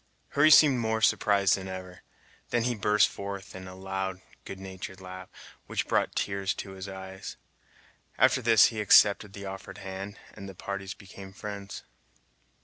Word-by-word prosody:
Hurry 145 +2 +4
seemed 150 -4 +7
more 110 -1 0
surprised 100 -2 +3
than 95 -1 -7
ever; 95 -1 -8 0.5
then 120 - +1
he 125 +1 +1
burst 105 -1 +3
forth 100 -1 -7
in 95 0 -8
a 95 - -9
loud, 95 0 -4 0.3
good 95 - -8
natured 95 0 -8
laugh, 95 0 -9 0.4
which - - -2
brought - - +1
tears 100 -1 -1
to 95 - -7
his 95 0 -8
eyes. 95 0 -8 0.8
After 130 0 +4
this 115 -3 +6
he 110 - -2
accepted 105 0 +5
the 100 -1 -8
offered 95 0 -8
hand, 95 +2 -7 0.2
and 100 0 -9
the 95 - -10
parties 100 +1 -5
became 95 -1 -12
friends. 100 -1 -7
100 Hz, 160 wpm, -28 LUFS, 95-105 Hz, 0.8 s, seemed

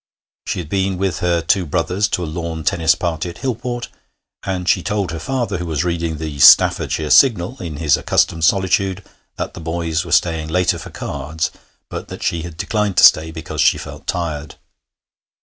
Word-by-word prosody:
She - - -2
had 85 -4 -5
been 95 +2 -1
with 95 -3 -1
her 85 -1 +1
two 90 +1 +1
brothers 90 +6 0
to 90 - -2
a - - -2
lawn 80 0 -5
tennis 80 -3 +2
party 85 0 -3
at 85 - -10
Hillport, 120 -1 -3 0.5
and 90 -2 -4
she 90 - +3
told 100 -1 -2
her 80 - -5
father, 120 -3 -2
who 90 - -4
was 80 -1 -1
reading 85 -2 -2
the 75 -2 -6
Staffordshire 75 +3 +5
Signal 115 -2 +4
in 80 -4 -5
his 75 -2 +2
accustomed 80 -1 +1
solitude, 95 +2 +1 0.3
that - - -5
the - - -9
boys 80 0 -2
were 85 - -9
staying 80 -1 +1
later 90 +3 +1
for - - -9
cards, 80 +1 -4 0.4
but - - -7
that - - -8
she 85 - -1
had 85 -1 -8
declined 105 0 -1
to - - +5
stay 80 +1 +7
because 80 0 -4
she - - +4
felt - - -10
tired. 80 -4 -3
85 Hz, 185 wpm, -19 LUFS, 80-95 Hz, 0.5 s, stay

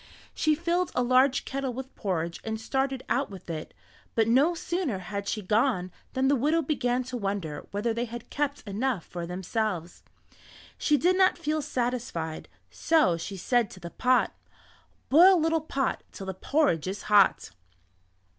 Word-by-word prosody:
She 310 -1 +2
filled 345 +3 0
a 250 - +2
large 255 +2 +3
kettle 270 -2 -3
with 265 +1 -7
porridge 170 -4 -2
and 220 0 -3
started 265 +3 -1
out 270 +3 0
with 190 -4 -8
it, 155 -1 -6 0.4
but 225 -1 +3
no 280 +9 +4
sooner 335 - -2
had 200 +2 -5
she 215 0 -2
gone 205 -2 +1 0.2
than 260 +1 +1
the 285 - +4
widow 305 +6 +2
began 255 -4 0
to 250 0 -5
wonder 195 -8 -3
whether 210 +3 -1
they 235 +2 -1
had 240 0 -9
kept 290 0 -2
enough 210 -1 -1
for 170 -1 -6
themselves. 180 -1 -3 0.7
She 300 - +2
did 360 +5 +3
not 375 0 +4
feel 305 +1 -1
satisfied, 240 - -3 0.2
so 310 - +3
she 190 +4 -6
said 240 +3 +1
to 185 - -12
the 170 -1 -8
pot: 255 0 +2 0.8
"Boil 355 +6 +7
little 325 0 +1
pot 275 -3 -1
Till 195 - -8
the 190 - -3
porridge 190 - +1
is 200 +2 -4
hot." 205 -2 +4
245 Hz, 165 wpm, -27 LUFS, 195-280 Hz, 0.8 s, Boil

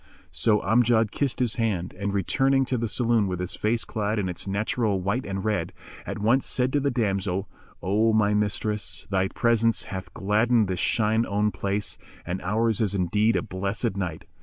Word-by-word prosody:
So 105 -2 +2
Amjad 115 0 +3
kissed 140 -3 -1
his 125 -2 0
hand, 100 -7 -1
and, 100 +2 -2
returning 135 +8 +2
to 125 0 -1
the 115 - -1
saloon 115 -1 +2
with 90 -1 -3
his 90 +1 -3
face 115 +2 0
clad 105 0 -2
in 95 -3 -1
its 90 - -6
natural 105 +1 0
white 100 +8 -2
and 95 0 -4
red, 105 -6 -1 0.3
at - - -4
once 115 +6 +2
said 130 0 0
to 145 - +3
the 140 0 +1
damsel, 100 -5 -1 0.4
"O 105 +5 +2
my 105 -1 +3
mistress, 105 0 -1
thy 95 0 +2
presence 115 +1 +1
hath 95 -3 -7
gladdened 110 +2 +2
this 90 -2 -2
shine 110 0 +2
own 105 +1 +1
place 100 +1 -3 0.3
and 90 +2 -3
ours 110 +4 0
is 100 -2 +1
indeed 105 +5 +2
a - - +1
blessed 100 -1 -2
night." 90 -5 -4
105 Hz, 185 wpm, -25 LUFS, 95-115 Hz, 0.4 s, Amjad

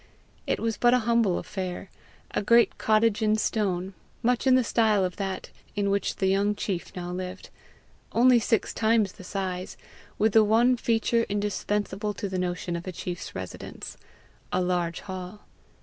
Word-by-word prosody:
It - - 0
was 225 -2 -1
but 240 0 +5
a 245 -3 0
humble 230 -6 +3
affair 185 -1 -5 0.4
a - - 0
great 235 +3 +4
cottage 215 -1 +3
in 215 0 +3
stone, 195 -4 -1 0.3
much 245 +2 +1
in 260 - +6
the 255 - +4
style 215 -4 +2
of 180 - -5
that 195 -2 -4 0.2
in 200 -1 +1
which 200 -1 0
the 190 - -1
young 200 +2 +2
chief 190 -4 -3
now 175 -1 -5
lived 185 +1 -6 0.6
only 245 +1 +5
six 225 -1 0
times 220 -3 +2
the - - -13
size, 185 -1 -4 0.4
with 215 0 +2
the 220 - +7
one 230 +4 +4
feature 230 0 +1
indispensable 205 0 -2
to 200 - -3
the 190 -1 -3
notion 175 -1 -2
of 170 +2 -6
a - - -2
chief's 175 0 -6
residence, 95 -1 -7 0.6
a 180 - +1
large 175 -2 -1
hall. 185 +2 -7
205 Hz, 165 wpm, -27 LUFS, 185-225 Hz, 0.6 s, the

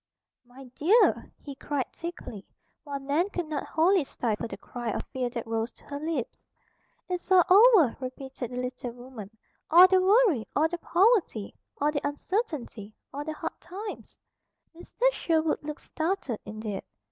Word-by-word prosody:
"My 255 +2 -13
dear!" 390 - +3
he 285 - -7
cried 275 -1 -3
thickly; 335 - -7 0.4
while 285 -2 -5
Nan 290 +8 0
could 355 -4 -3
not 305 -2 -3
wholly 345 +2 +3
stifle 230 -5 -3
the - - -7
cry 240 -2 -6
of - - -3
fear 255 -2 -1
that 235 -1 -5
rose 225 +1 -2
to - - -22
her 285 0 -6
lips. 305 -6 -4 0.6
"It's 360 0 -4
all 370 -2 +7 0.3
over," 300 - +4
repeated 260 -1 -6
the 250 - -7
little 250 0 -4
woman. 245 -4 -10 0.4
"All 350 +3 +9
the 375 0 +4
worry, 385 - +4
all 310 +2 +4
the 345 +1 -5
poverty, 365 - +2 0.3
all 295 +1 +2
the 285 -2 -2
uncertainty, 290 - -3 0.2
all 285 +1 -4
the 310 +1 -4
hard 325 +1 -6
times." 400 +4 -8 0.6
Mr. 350 +7 -10
Sherwood 320 -8 0
looked 300 +1 -6
startled 320 - -2
indeed. 215 -2 -5
290 Hz, 160 wpm, -28 LUFS, 245-350 Hz, 0.6 s, All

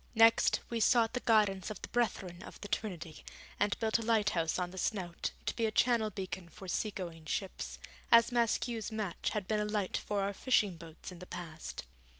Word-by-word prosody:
Next, 225 0 +6
we 235 - 0
sought 230 +1 +4
the 250 - 0
guidance 210 -5 +3
of 215 - -6
the - - -4
Brethren 190 -7 -1
of - - -10
the 205 - -5
Trinity, 175 -7 -4 0.4
and 205 - +2
built 220 0 +2
a - - -3
lighthouse 210 -8 +2
on 180 -1 -2
the 190 - -10
Snout, 180 -4 -1 0.2
to - - -1
be 230 -2 +1
a - - -1
Channel 230 -1 +3
beacon 185 -3 -5
for 190 - -11
sea 215 +4 0
going 170 -5 -7
ships, 190 +4 -3 0.3
as 230 +1 +7
Maskew's 235 -1 0
match 215 -5 -2
had 210 -4 -2
been 215 +1 +1
a 210 - 0
light 210 -3 -1
for 205 -1 -1
our 200 +1 -1
fishing 205 -4 +2
boats 165 +1 -10
in 180 - -10
the 180 - -10
past. 165 -2 -6
205 Hz, 200 wpm, -33 LUFS, 180-225 Hz, 0.4 s, as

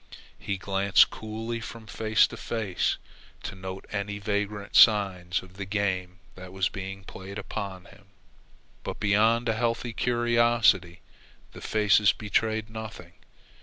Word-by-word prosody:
He 100 - -3
glanced 95 0 +3
coolly 110 +2 -5
from 115 0 -9
face 110 0 +2
to - - -8
face 110 -6 -1 0.5
to - - -5
note 95 0 -7
any 100 0 -3
vagrant 105 0 -3
signs 95 -5 +5
of 95 +1 -16
the 100 - -4
game 95 -3 -2 0.2
that 90 0 -11
was 95 0 0
being 95 0 -7
played 95 +1 -9
upon 100 -2 -6
him, 100 0 -18 0.8
but - - -5
beyond 110 +4 +3
a 115 - +2
healthy 115 +1 -1
curiosity 120 -7 +2 0.5
the - - -11
faces 105 -1 +3
betrayed 110 +1 -1
nothing. 110 -6 -9
100 Hz, 130 wpm, -27 LUFS, 95-110 Hz, 0.8 s, signs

